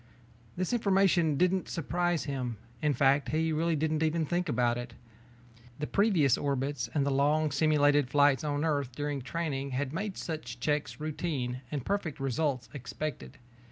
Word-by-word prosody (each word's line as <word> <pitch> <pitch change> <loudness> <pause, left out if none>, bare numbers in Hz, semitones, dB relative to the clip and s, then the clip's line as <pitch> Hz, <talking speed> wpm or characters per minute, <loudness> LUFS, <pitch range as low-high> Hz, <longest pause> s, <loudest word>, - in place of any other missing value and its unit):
This 185 +6 -1
information 190 - +3
didn't 180 +2 +1
surprise 175 +1 0
him, 125 -5 -3 0.2
in 150 -2 +2
fact, 140 +2 +3
he 160 +1 +1
really 165 +1 +1
didn't 155 +1 0
even 160 0 +1
think 175 +2 -1
about 120 -2 +2
it. 120 -1 -6 0.8
The 150 - -2
previous 180 - +3
orbits 135 -3 -1
and 140 -2 +2
the 140 - +1
long 150 +3 +2
simulated 145 -1 +3
flights 145 0 +4
on 145 +1 -1
Earth 140 -5 -1
during 145 -1 -2
training 140 -1 -3
had 140 0 -2
made 195 +3 -3
such 150 -7 -5
checks 150 +4 -1
routine 145 -5 -3
and 140 -3 -4
perfect 200 -7 -2
results 135 -2 -1
expected. 135 - -6
145 Hz, 155 wpm, -30 LUFS, 135-160 Hz, 0.8 s, flights